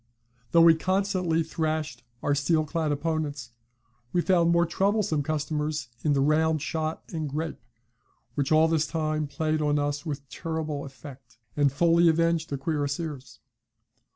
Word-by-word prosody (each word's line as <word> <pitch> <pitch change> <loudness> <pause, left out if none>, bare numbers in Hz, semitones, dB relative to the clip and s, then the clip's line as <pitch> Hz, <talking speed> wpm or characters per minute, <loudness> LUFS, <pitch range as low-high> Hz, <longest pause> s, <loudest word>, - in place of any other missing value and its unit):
"Though 165 - +6
we 165 0 +8
constantly 185 -1 0
thrashed 155 -4 -2 0.2
our 145 - +2
steel 155 +2 +1
clad 155 0 -1
opponents, 145 -4 -2 0.6
we 175 - +2
found 175 -3 +3
more 170 0 +4
troublesome 195 -2 +1
customers 150 -3 -2
in 150 - +2
the 140 - +2
round 155 +1 +2
shot 160 0 -3
and 155 -3 -3
grape, 155 +3 -4 0.7
which 140 +2 -1
all 155 +1 +5
this 160 -1 +1
time 155 -2 -1
played 155 +2 -1
on 150 0 +2
us 145 0 -1
with 140 -3 -5
terrible 155 -1 -4
effect, 135 -3 -12 0.2
and 145 -2 +3
fully 170 +3 +4
avenged 165 0 +1
the 140 - -2
cuirassiers. 145 -1 -3
155 Hz, 145 wpm, -27 LUFS, 145-165 Hz, 0.7 s, we